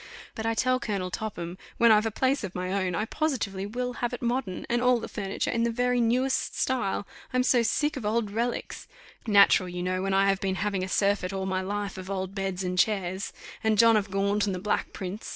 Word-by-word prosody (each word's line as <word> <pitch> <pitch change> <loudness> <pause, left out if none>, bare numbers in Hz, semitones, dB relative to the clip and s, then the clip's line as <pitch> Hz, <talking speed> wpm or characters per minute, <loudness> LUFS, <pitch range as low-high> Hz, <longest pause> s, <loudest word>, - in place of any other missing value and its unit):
But 225 0 -4
I 225 - +1
tell 255 +2 +2
Colonel 195 -6 -3
Topham, 185 -4 -5 0.2
when 235 -1 +6
I've 215 +1 +5
a - - +1
place 260 +5 0
of 190 -3 -5
my 185 +1 -2
own, 185 -3 0
I 210 - 0
positively 210 -9 -2
will 250 +3 -3
have 240 0 -1
it 245 - -5
modern, 240 -6 -2
and 240 0 +1
all 250 -1 +4
the - - -6
furniture 195 -2 -3
in 235 - 0
the 235 - +2
very 245 +1 +1
newest 250 +3 +1
style. 245 -6 0 0.3
I'm 255 -1 +2
so 250 -1 +4
sick 295 +6 +1
of 260 - -5
old 215 0 0
reliques! 235 +3 -3 0.4
Natural, 200 -3 +5
you 180 0 -4
know, 185 0 -1
when 195 0 0
I 195 +1 +4
have 195 0 +1
been 190 -1 0
having 195 -1 -1
a - - -2
surfeit 200 -1 +1
all 190 0 -2
my 190 0 -1
life 200 0 -3
of 185 0 -8
old 190 -1 -3
beds 195 -2 -3
and 180 0 -1
chairs, 190 -2 0 0.3
and 220 -1 +2
John 230 +1 +6
of 205 -1 +1
Gaunt 200 +1 +1
and 195 - -1
the - - -4
Black 210 +3 -1
Prince. 190 +3 -6
205 Hz, 230 wpm, -27 LUFS, 190-235 Hz, 0.4 s, when